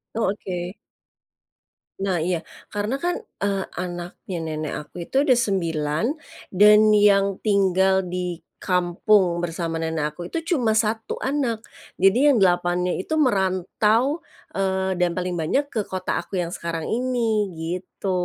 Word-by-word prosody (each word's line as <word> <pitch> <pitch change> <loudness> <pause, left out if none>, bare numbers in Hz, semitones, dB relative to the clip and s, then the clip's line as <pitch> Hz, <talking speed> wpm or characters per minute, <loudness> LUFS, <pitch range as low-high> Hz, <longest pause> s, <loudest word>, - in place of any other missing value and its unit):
Oh, 220 -4 +1
oke. 180 -2 -5 1.3
Nah, 185 -3 +1
iya. 170 +1 -1 0.3
Karena 210 +6 -2
kan, 350 +2 0 0.2
eee, 200 -1 0
anaknya 175 0 -5
nenek 155 -1 -3
aku 175 -1 -8
itu - - -12
ada 290 - +2
9, 165 -7 0 0.5
dan 210 +2 +6
yang 200 -2 +4
tinggal 190 -2 +3
di 180 -1 -4 0.2
kampung 180 0 +2
bersama 165 -1 -3
nenek 160 -2 -1
aku 175 0 -6
itu 330 +1 -1
cuma 230 -4 +2
1 220 0 0
anak. 260 -5 0 0.4
Jadi 230 +10 +5
yang - - +3
8-nya 180 -1 +2
itu 190 - -4
merantau, 220 - +2 0.3
eee, 190 -1 0
dan 175 -1 +1
paling 180 -1 -2
banyak 275 - 0
ke 215 -3 -2
kota 185 -1 -2
aku - - -7
yang 170 -1 -4
sekarang 165 -2 -4
ini, 230 -3 +1
gitu. 180 +4 -4
190 Hz, 135 wpm, -23 LUFS, 175-215 Hz, 1.3 s, dan